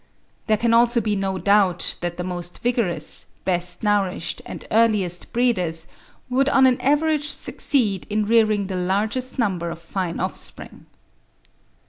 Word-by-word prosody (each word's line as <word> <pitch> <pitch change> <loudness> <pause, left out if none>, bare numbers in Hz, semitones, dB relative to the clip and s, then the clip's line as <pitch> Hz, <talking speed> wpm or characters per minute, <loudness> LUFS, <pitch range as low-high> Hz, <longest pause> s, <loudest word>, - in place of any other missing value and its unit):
There 215 - +3
can 230 +1 +1
also 235 +1 +4
be 210 -2 -1
no 195 -1 -2
doubt 195 -3 +2
that 175 -1 -3
the 180 - -3
most 175 -1 -5
vigorous, 220 -10 +1 0.2
best 180 0 -1
nourished 200 -5 0
and - - -8
earliest 210 -6 +1
breeders 180 -10 0 0.4
would 265 +2 +1
on 270 -1 +5
an 255 -1 +3
average 295 +1 +1
succeed 220 -11 0
in 210 0 0
rearing 215 -2 +3
the 190 -1 -4
largest 210 +9 -1
number 185 -8 -1
of 165 - -6
fine 170 0 -4
offspring. - - -5
205 Hz, 140 wpm, -22 LUFS, 180-235 Hz, 0.4 s, on